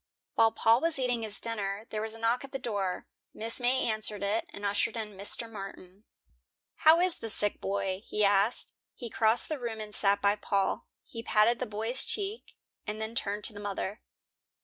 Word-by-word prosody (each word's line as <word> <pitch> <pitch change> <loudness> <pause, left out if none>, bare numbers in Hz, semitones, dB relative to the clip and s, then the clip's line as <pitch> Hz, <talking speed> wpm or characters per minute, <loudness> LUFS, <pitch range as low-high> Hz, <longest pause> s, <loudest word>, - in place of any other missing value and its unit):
While 225 0 +4
Paul 230 +3 +3
was 330 -2 0
eating 250 -3 0
his 215 -2 -2
dinner, 210 -2 0
there 215 - -2
was 220 0 -2
a - - -11
knock 230 +3 +1
at 275 - -10
the 270 - -3
door. 200 -7 -3 0.3
Mrs. 230 +3 +3
May 255 +2 +2
answered 215 -2 0
it, 205 +3 0
and 205 - -7
ushered 205 +3 0
in 210 -2 -5
Mr. 205 +4 -1
Martin. 195 -1 -10 0.7
"How 320 +2 +6
is 360 -1 +2
the 225 - -5
sick 205 0 0
boy?" 195 -1 -2
he 210 -1 +1
asked. 200 +3 +2 0.2
He 235 -3 -7
crossed 220 +1 +3
the 310 -3 -3
room 230 -3 -4
and 210 -1 -7
sat 200 -1 +3
by 200 +1 +2
Paul. 200 -2 -1 0.2
He 230 - -8
patted 230 +1 +3
the - - -2
boy's 220 +5 +3
cheek, 415 +2 -4 0.3
and 210 +1 -3
then 220 +1 -4
turned 205 -2 -1
to 215 - +4
the 205 - -9
mother. 205 0 -4
220 Hz, 195 wpm, -30 LUFS, 205-235 Hz, 0.7 s, How